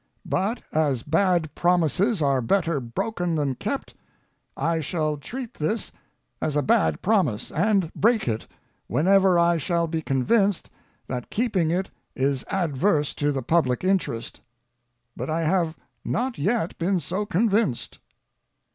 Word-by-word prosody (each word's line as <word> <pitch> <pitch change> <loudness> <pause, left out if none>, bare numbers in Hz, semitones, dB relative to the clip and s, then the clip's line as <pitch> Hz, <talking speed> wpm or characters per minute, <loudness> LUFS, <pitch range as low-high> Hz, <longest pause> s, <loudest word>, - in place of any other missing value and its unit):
But, 215 +6 -1
as 145 -6 +1
bad 165 -1 +1
promises 180 - +2
are 135 -2 +2
better 165 +3 +1
broken 170 - -2
than 145 -3 0
kept, - - -4 0.6
I 165 +3 0
shall 155 0 -1
treat 240 - -7
this 160 +9 -2 0.5
as 150 - -1
a 145 - +2
bad 80 - +2
promise, 175 - +1
and 190 -1 +1
break 225 - +2
it, 110 -2 -2 0.4
whenever 190 +2 +4
I 170 0 +4
shall 170 +2 0
be 160 -1 -2
convinced 195 - +1 0.3
that 125 -1 -5
keeping 205 -8 0
it 185 +3 -1 0.2
is 135 0 0
adverse 160 -3 +1
to 145 0 0
the 135 -2 -3
public 130 -2 +1
interest. 185 -12 -1 0.7
But - - -5
I 165 +1 0
have 165 -1 +1 0.3
not 250 +1 -2
yet 200 +3 0
been 180 +2 +1
so 190 +5 -3
convinced. 205 - 0
170 Hz, 135 wpm, -25 LUFS, 145-195 Hz, 0.7 s, whenever